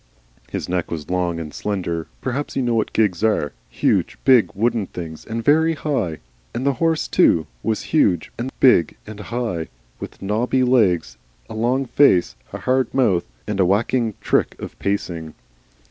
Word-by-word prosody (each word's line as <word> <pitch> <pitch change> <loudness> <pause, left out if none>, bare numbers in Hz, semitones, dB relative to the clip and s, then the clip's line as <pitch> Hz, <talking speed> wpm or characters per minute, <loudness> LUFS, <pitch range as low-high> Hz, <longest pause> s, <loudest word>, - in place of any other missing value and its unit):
His - - -4
neck 90 -1 -2
was 80 0 -5
long 90 -2 0
and 75 -2 -7
slender. 85 -5 -3
Perhaps 130 +3 -3
you 135 - 0
know 120 -1 +1
what 110 -2 0
gigs 105 -4 +1
are, 105 -10 +1 0.2
huge, - - 0
big, 120 -9 +6
wooden 110 -1 0
things 80 -3 -8
and 115 0 -4
very 160 +2 +4
high 120 - -2 0.4
and 125 +3 -2
the 140 - +3
horse, 165 -1 +1
too, 80 - +3 0.2
was 110 - -1
huge 95 - +2
and 125 +3 -4
big 105 - +4
and 105 0 -9
high, 105 -5 -3 0.3
with - - -8
knobby 115 +6 0
legs, 90 - +2 0.3
a - - -5
long 120 +5 0
face, 125 -9 +3 0.2
a - - -7
hard 130 -1 +1
mouth, 105 -10 +2 0.2
and 105 -1 -3
a 95 - +5
whacking 110 +2 +1
trick - - 0
of - - -7
pacing. 85 -6 -3
105 Hz, 165 wpm, -21 LUFS, 90-125 Hz, 0.4 s, big